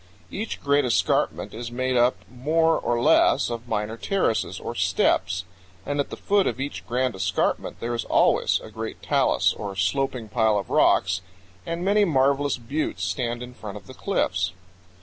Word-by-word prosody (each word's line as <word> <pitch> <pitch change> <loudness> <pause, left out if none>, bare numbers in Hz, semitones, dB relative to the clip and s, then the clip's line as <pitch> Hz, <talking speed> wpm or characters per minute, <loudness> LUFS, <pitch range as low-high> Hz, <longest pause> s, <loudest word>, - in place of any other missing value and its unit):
Each 220 +3 -4
great 145 0 +2
escarpment 125 -2 0
is 115 +1 -6
made 130 +1 -1
up 120 +1 +4
more 160 +7 +1
or 120 0 0
less 120 - +4
of 120 +1 -5
minor 105 0 -2
terraces, 190 - 0
or - - -5
steps; 90 +1 +1 0.4
and 145 0 -2
at 140 - 0
the - - -7
foot 200 -1 +2
of - - -2
each 140 +1 -5
grand 125 0 0
escarpment 95 +1 -1
there 120 +1 -3
is 115 - -2
always - - +3
a - - -10
great - - -6
talus, - - +2
or 100 -1 -6
sloping 115 +5 -1
pile 110 -1 +2
of 100 -3 -4
rocks, 90 0 +3 0.5
and 170 +2 -3
many 205 +1 +4
marvelous 140 -4 +2
buttes 130 +6 -3
stand 120 -2 -2
in 125 0 -9
front 105 -4 -8
of 100 - -13
the - - -11
cliffs. - - -1
125 Hz, 170 wpm, -24 LUFS, 110-140 Hz, 0.5 s, up